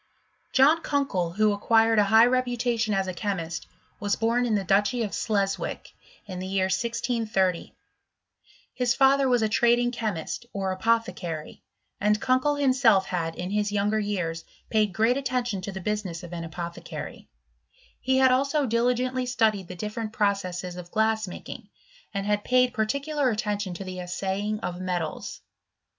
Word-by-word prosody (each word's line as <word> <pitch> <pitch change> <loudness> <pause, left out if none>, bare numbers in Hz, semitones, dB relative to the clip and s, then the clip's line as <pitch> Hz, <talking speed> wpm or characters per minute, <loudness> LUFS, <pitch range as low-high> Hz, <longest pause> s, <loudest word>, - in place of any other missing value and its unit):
John 295 +5 +5
Kunkel, 215 - -1
who 215 +2 +3
acquired 225 +2 +3
a 205 - +5
high 220 +3 +6
reputation 245 -2 0
as 195 0 +1
a 185 - -4
chemist, 175 -4 -3 0.3
was 205 -1 0
born 235 +2 +1
in 220 - +1
the 200 - 0
Duchy 205 +6 +2
of 210 - -4
Sleswick, 200 -3 -2 0.3
in 185 -3 -6
ihe 185 - -4
year 190 -1 +1
1 - - -2
630; 225 -5 -1 1.0
his 250 -1 +1
father 270 0 +4
was 245 -2 +3
a - - +3
trading 240 +3 +3
chemist, 220 -1 -4
or 195 -1 -2
apothe 225 -1 +1
cary; 165 -5 -6 0.4
and 210 +1 +2
Kunkel 255 +4 +2
himself 255 -8 +4
had, 165 -2 -2
in 180 +2 -5
liis 210 0 0
younger 205 +1 +1
years, 180 -6 -2 0.3
paid 215 -2 +2
great 225 +7 +2
attention 245 -6 -1
to 200 - -5
the 190 - -6
business 190 -4 -3
of 175 0 -9
an 170 -1 -4
apothecary: 170 +1 -7 0.8
lie 260 - +4
had 260 -1 +5
also 275 +3 +2
diligently 250 +2 0
studied 220 -6 +1
the 180 - -8
different 215 +3 -4
processes 185 -4 -1
of 175 -1 -8
glass 220 +1 +1
making; 180 - -9 0.4
and 200 -1 -3
had 205 0 0
paid 250 0 +3
particular 280 +5 0
attention 210 -4 -2
to 195 - -6
the 185 -1 -6
assaying 195 +4 -2
of 180 0 -4
metals. 175 -4 -3
210 Hz, 160 wpm, -26 LUFS, 190-245 Hz, 1.0 s, high